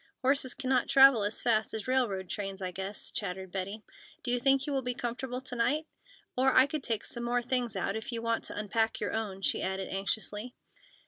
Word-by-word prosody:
Horses 265 -1 +2
cannot 260 0 +1
travel 270 -5 +7
as 205 +2 0
fast 220 -2 +2
as 220 +1 -5
railroad 230 -8 0
trains, 195 0 -4
I 185 -1 -3
guess," 195 +3 -3
chattered 190 -2 -4
Betty. 195 +3 -3 0.4
"Do 245 - +1
you 245 - +3
think 270 +1 +4
you 290 - -2
will 270 - +1
be 250 -1 -1
comfortable 250 +2 -4
to 260 -1 -5
night? 285 +7 +1 0.5
Or, 265 +1 +3
I 260 - +7
could 300 +1 -3
take 225 -5 -1
some 240 - -6
more 240 0 0
things 245 -3 +1
out, 195 +2 -1
if 220 +3 -5
you 235 - 0
want 230 0 -1
to - - -5
unpack 220 +2 0
your - - -2
own," 200 -3 -3
she - - +1
added 190 0 -2
anxiously. 210 +4 -2
230 Hz, 210 wpm, -30 LUFS, 200-255 Hz, 0.5 s, travel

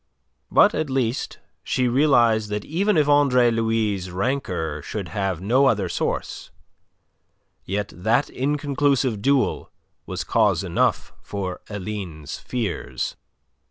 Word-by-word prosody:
But, - - +5
at 155 -1 -2
least, 130 -2 -1 0.3
she 125 -1 0
realized 120 -5 +3
that 105 0 -3
even 195 +4 +1
if 150 -2 +3
Andre 135 -5 +4
Louis' 110 -4 0
rancour 90 - -2
should 100 +3 -5
have 95 -5 -2
no 125 +8 +3
other 105 -7 +1
source, - - -3 1.2
yet 100 +1 -3
that 115 - +1
inconclusive 140 -4 0
duel 140 +2 +1 0.4
was - - -3
cause - - +2
enough - - 0
for 95 -3 -5
Aline's 95 -7 -6
fears. 115 -8 -3
115 Hz, 115 wpm, -23 LUFS, 100-135 Hz, 1.2 s, But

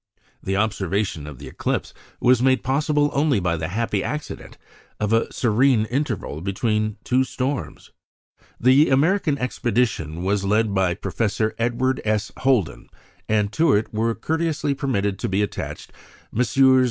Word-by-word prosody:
The 95 0 -2
observation 100 -6 -1
of 75 -4 -9
the - - -10
eclipse - - -3 0.3
was 125 -1 +4
made 130 0 +3
possible 145 +2 +1
only 140 -5 +2
by 90 -2 0
the 80 0 -3
happy 105 +1 -1
accident 150 0 -6 0.4
of 105 +1 0
a 115 - +1
serene 120 0 +2
interval 115 - -3
between 105 +3 -1
two 130 +1 +2
storms. 130 +1 -4 0.7
The 130 +5 +5
American 150 +3 +2
expedition 115 - -1
was 100 +1 0
led 105 +1 +1
by 95 -2 +1
Professor 110 +1 -1
Edward 125 +3 0
S. 110 -1 -1
Holden, 125 -9 0 0.4
and 105 -1 +1
to 165 +1 +3
it 105 +2 -1
were 115 +1 0
courteously 160 -3 -1
permitted 100 -8 -1
to - - -2
be 95 +2 +1
attached 105 - -6 0.4
Messrs. 130 +3 +4
115 Hz, 140 wpm, -22 LUFS, 100-130 Hz, 0.7 s, The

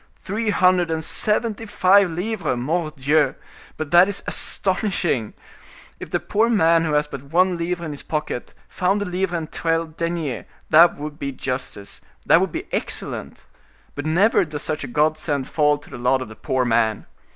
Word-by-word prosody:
Three 215 +3 -3
hundred 185 -3 +3
and 160 0 -2
seventy 220 +4 0
five 195 -1 +4
livres! 180 - -2
Mordioux! 155 +1 0 0.4
but 155 -2 -5
that 175 +2 +7
is 200 -1 -2
astonishing! 185 - 0 0.6
If - - -8
the - - 0
poor 225 +3 +1
man 165 -6 +3
who 155 - -1
has 150 0 +2
but 140 -2 -9
one 180 +5 +2
livre 170 0 -3
in 155 - -5
his 145 - -8
pocket, 150 -5 -4
found 195 +3 0
a - - -5
livre 180 -1 -2
and 160 -2 -6
twelve 165 -1 -2
deniers, 165 - -3 0.3
that 165 +2 +6
would 150 0 -7
be 140 - -3
justice, 130 -6 -5 0.2
that - - +5
would - - -1
be - - -5
excellent; - - -3 0.5
but 145 +2 -5
never 190 +8 +3
does 150 -3 -6
such 155 -1 -3
a - - -5
godsend 150 0 0
fall 150 -1 +2
to 145 - -17
the - - -8
lot 130 +2 +1
of 110 - -11
the 110 - -11
poor 130 +3 -1
man. 115 -2 +1
160 Hz, 175 wpm, -22 LUFS, 145-180 Hz, 0.6 s, that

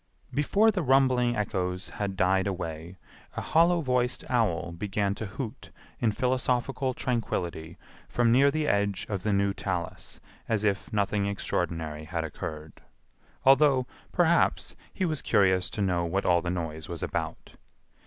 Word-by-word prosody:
Before 200 - +3
the 195 -3 -1
rumbling 130 -3 +3
echoes 90 -3 -2
had 100 -2 -4
died 95 +1 +2
away 85 -1 -5 0.4
a - - -1
hollow 170 +1 +3
voiced 125 -3 0
owl 90 -9 +1
began 100 +3 -1
to 110 +1 -5
hoot 115 +4 -7 0.3
in 115 -2 +2
philosophical 130 +2 0
tranquillity 85 -9 -3 0.3
from 120 -1 +2
near 135 +4 +6
the 155 +1 -1
edge 100 -3 0
of 100 -3 -2
the 105 - 0
new 100 0 +2
talus - - -4 0.3
as 110 -2 +1
if 100 +1 0
nothing 100 -1 0
extraordinary 80 -6 -3
had 85 0 -3
occurred, 80 0 -7 0.6
although, 135 -1 +5 0.3
perhaps, 170 -1 +2 0.2
he 190 - -1
was 155 -4 -1
curious 95 -2 +3
to 105 - -2
know 90 -2 +1
what 95 +4 -1
all 85 -1 +4
the 85 - -3
noise 80 -3 -4
was 85 -2 -5
about. - - -4
100 Hz, 145 wpm, -28 LUFS, 90-130 Hz, 0.6 s, near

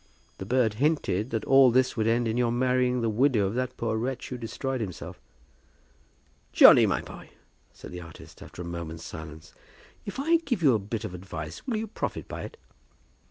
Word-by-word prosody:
"The 95 - -6
bird 120 -2 +2
hinted 140 - +1
that 110 -3 -3
all 135 -1 +6
this 130 +1 +2
would 110 -2 0
end 115 +1 +2
in 110 - -1
your 120 -1 +1
marrying 125 0 +1
the 115 - 0
widow 115 -1 +2
of 95 - -2
that 125 +1 -3
poor 110 -1 -1
wretch 125 +3 -3
who 125 - -5
destroyed 130 +2 -4
himself." 95 -5 -7 1.3
"Johnny, - - +8
my - - -1
boy," - - -11 0.4
said - - -12
the 90 0 -7
artist, 85 -1 -13
after 90 - -9
a - - -8
moment's 85 -1 -6
silence, 80 -1 -10 0.5
"if 200 - -7
I 325 +4 +3
give 270 - -3
you 135 -4 +6
a 110 - +2
bit 105 +2 -5
of - - -5
advice, 85 - -8
will 235 -4 -1
you 220 - -2
profit 220 - -5
by - - -6
it?" - - -9
120 Hz, 195 wpm, -27 LUFS, 95-130 Hz, 1.3 s, Johnny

